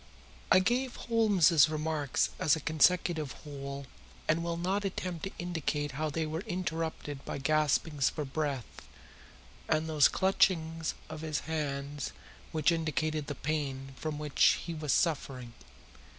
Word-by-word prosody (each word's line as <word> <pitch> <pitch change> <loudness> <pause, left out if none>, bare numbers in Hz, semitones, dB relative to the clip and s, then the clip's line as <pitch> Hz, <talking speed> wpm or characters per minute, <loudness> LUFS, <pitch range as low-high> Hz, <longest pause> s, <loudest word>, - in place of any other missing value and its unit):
I - - +8
gave 245 +7 +1
Holmes's 195 - +4
remarks 155 -2 0
as 155 - +4
a - - -4
consecutive 160 -1 +2
whole 140 -2 -6 0.4
and 160 +2 +2
will 170 0 -2
not 190 +4 0
attempt 185 -3 -3
to 195 - -4
indicate 155 -4 -2
how 155 +4 -2
they 160 +2 -1
were 155 +1 -3
interrupted 160 -5 -3
by - - -4
gaspings 150 0 +2
for 150 - -4
breath 140 -3 -2 1.0
and 155 0 +2
those 155 -3 +5
clutchings 165 -4 +1
of 155 - -7
his 155 -2 -2
hands 145 -2 -3 0.4
which 160 +1 +3
indicated 155 -2 -1
the 145 - -4
pain 135 -2 -3
from 155 +1 -4
which 150 -1 +3
he 170 - -4
was 155 -3 -2
suffering. 135 -7 0
155 Hz, 135 wpm, -31 LUFS, 145-165 Hz, 1.0 s, I